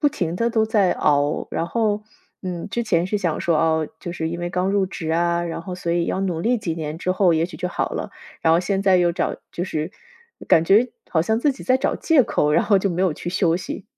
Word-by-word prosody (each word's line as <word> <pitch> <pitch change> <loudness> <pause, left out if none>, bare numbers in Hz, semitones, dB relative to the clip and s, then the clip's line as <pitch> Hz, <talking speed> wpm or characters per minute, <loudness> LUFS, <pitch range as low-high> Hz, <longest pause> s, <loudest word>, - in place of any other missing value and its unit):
不 295 - +4
停 175 - -3
地 230 +3 +1
都 225 -2 +2
在 205 -4 +3
熬， 145 +1 +1
然 - - -1
后， 215 -2 0 0.4
嗯， 180 0 -5
之 235 +4 -2
前 180 -6 +1
是 210 - -1
想 170 -5 -1
说， 170 -2 +1
哦， 160 0 +2
就 175 - -5
是 160 -2 -3
因 170 +1 -5
为 175 0 -3
刚 180 +1 0
入 200 -1 +2
职 165 -4 -5
啊， 170 +1 +1
然 165 -1 -5
后 180 +1 -6
所 170 -2 -2
以 170 -1 +1
要 - - -1
努 180 -4 -1
力 240 +7 +1
几 170 -6 -3
年 155 -1 -5
之 185 +1 0
后， 185 -2 +3
也 160 +1 +1
许 180 - -11
就 180 -1 -3
好 - - -2
了， - - -4 0.3
然 160 - +3
后 165 - +5
现 195 +2 -1
在 190 -2 +5
又 175 -1 +3
找 - - -2 0.2
就 175 - -3
是 160 -2 -3 0.6
感 160 - +5
觉 210 +8 +4 0.2
好 160 -2 +1
像 220 +5 +1
自 285 +4 +2
己 265 - -11
在 255 - +3
找 260 - 0
借 300 -7 +3
口， 150 0 +1
然 165 - +3
后 205 - +4
就 195 - 0
没 175 +1 -2
有 185 -5 +2
去 175 - -5
休 175 -3 +2
息。 185 +2 -6
180 Hz, 280 characters per minute, -22 LUFS, 165-200 Hz, 0.6 s, 后